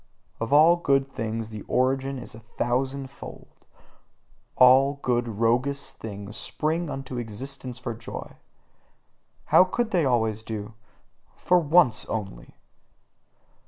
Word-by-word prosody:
Of 115 Hz, +2 st, -3 dB
all 160 Hz, +4 st, +6 dB
good 140 Hz, -5 st, +2 dB
things 115 Hz, -1 st, -4 dB
the 110 Hz, -2 st, -7 dB
origin 135 Hz, +1 st, 0 dB
is 125 Hz, -, -8 dB
a 110 Hz, -, -11 dB
thousandfold, 130 Hz, +4 st, -4 dB, 1.1 s
all 130 Hz, +3 st, +6 dB
good 120 Hz, -1 st, +1 dB
roguish 120 Hz, +6 st, 0 dB
things 105 Hz, -4 st, -8 dB
spring 155 Hz, -, -2 dB
into 135 Hz, -3 st, -5 dB
existence 125 Hz, +3 st, -6 dB
for 125 Hz, -1 st, -5 dB
joy: 115 Hz, 0 st, -9 dB, 1.2 s
how -, -, +9 dB
could 220 Hz, +5 st, -2 dB
they 175 Hz, -5 st, +2 dB
always 110 Hz, -4 st, +1 dB
do 110 Hz, -2 st, -6 dB
so 110 Hz, +1 st, -37 dB
for 180 Hz, 0 st, +3 dB
once 155 Hz, -6 st, +3 dB
only! 95 Hz, -, -6 dB
125 Hz, 120 wpm, -25 LUFS, 115-140 Hz, 1.2 s, how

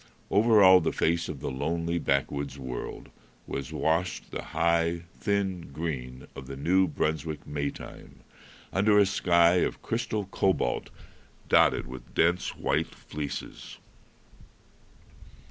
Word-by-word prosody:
Over 105 Hz, 0 st, +5 dB
all 95 Hz, -1 st, +9 dB
the 80 Hz, -, 0 dB
face 85 Hz, +1 st, 0 dB
of 70 Hz, -, -6 dB
the -, -, -3 dB
lonely 85 Hz, +5 st, -1 dB
backwoods 70 Hz, 0 st, -1 dB
world 65 Hz, -2 st, -6 dB, 0.3 s
was 70 Hz, -1 st, -5 dB
washed 85 Hz, +3 st, -1 dB
the -, -, -4 dB
high, 85 Hz, 0 st, 0 dB
thin 95 Hz, -6 st, -2 dB
green 65 Hz, -5 st, -5 dB
of 65 Hz, -, -9 dB
the 70 Hz, -, -6 dB
New 90 Hz, +7 st, +2 dB
Brunswick 80 Hz, 0 st, -2 dB
May 70 Hz, -1 st, -2 dB
time, -, -, -11 dB, 0.5 s
under 105 Hz, +3 st, +4 dB
a 100 Hz, -, +6 dB
sky 85 Hz, -2 st, +4 dB
of -, -, -1 dB
crystal 115 Hz, -3 st, -2 dB
cobalt 95 Hz, 0 st, 0 dB, 0.6 s
dotted -, -, +4 dB
with 65 Hz, -1 st, -11 dB
dense 85 Hz, +2 st, +2 dB
white -, -, -1 dB
fleeces. 75 Hz, -2 st, -7 dB
85 Hz, 125 wpm, -28 LUFS, 70-95 Hz, 0.6 s, all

